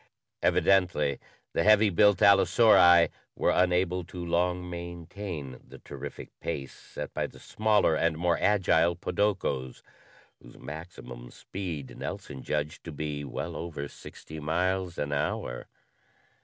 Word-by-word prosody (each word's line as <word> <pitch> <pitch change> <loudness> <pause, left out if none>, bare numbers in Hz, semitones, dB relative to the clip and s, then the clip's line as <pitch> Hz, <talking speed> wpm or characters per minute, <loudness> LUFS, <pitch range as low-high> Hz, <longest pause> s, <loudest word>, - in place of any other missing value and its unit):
Evidently, 85 -8 +2 0.3
the - - +1
heavy 105 +1 +5
built 105 +2 +4
allosauri 95 -3 +6 0.3
were - - +2
unable 90 0 +2
to 85 0 -7
long 90 +1 0
maintain 85 -4 -7
the - - -13
terrific - - -9
pace 70 -1 -4
set - - -8
by - - -1
the - - -16
smaller 105 -6 +2
and 80 0 +1
more 85 0 +2
agile 85 -4 +3
podokos 90 -9 -1 0.6
whose - - -15
maximum 65 -5 -9
speed 85 -7 -7
Nelson 65 - -6
judged 75 0 -3
to 80 - -7
be 75 -1 -4
well 70 - -5
over 75 -4 -5
sixty 80 +2 -11
miles 90 +3 -1
an 75 0 -2
hour. 70 -3 -2
85 Hz, 125 wpm, -28 LUFS, 75-95 Hz, 0.6 s, allosauri